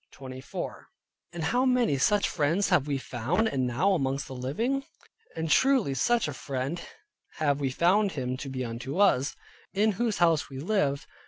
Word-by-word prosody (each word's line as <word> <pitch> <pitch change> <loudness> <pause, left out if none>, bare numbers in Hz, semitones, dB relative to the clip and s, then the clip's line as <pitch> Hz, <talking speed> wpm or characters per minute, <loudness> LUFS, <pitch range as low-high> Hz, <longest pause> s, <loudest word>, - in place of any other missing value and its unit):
And 170 -1 -5
how 245 +11 +2
many 250 - +2
such 205 +8 +3
friends 165 +6 +1
have 165 -7 +3
we 140 -2 0
found, 135 - -1
and 130 -2 0
now 150 +12 +2
living 135 - -2
amongst? 275 - -8 0.5
And 160 0 -2
truly 255 - +3
such 235 - +2
a 150 - -4
friend 135 +5 -4 0.5
have 145 -3 +1
we 140 -2 0
found 185 +8 +2
him 130 -3 -2
to 135 +1 -6
be 130 -1 -3
unto 120 +6 -5
us, 145 -9 +3 0.4
in 215 +2 +3
whose 230 -4 +1
house 165 -3 +3
we 135 - -8
lived, 145 -3 0
viz. - - -18
150 Hz, 165 wpm, -28 LUFS, 135-200 Hz, 0.5 s, such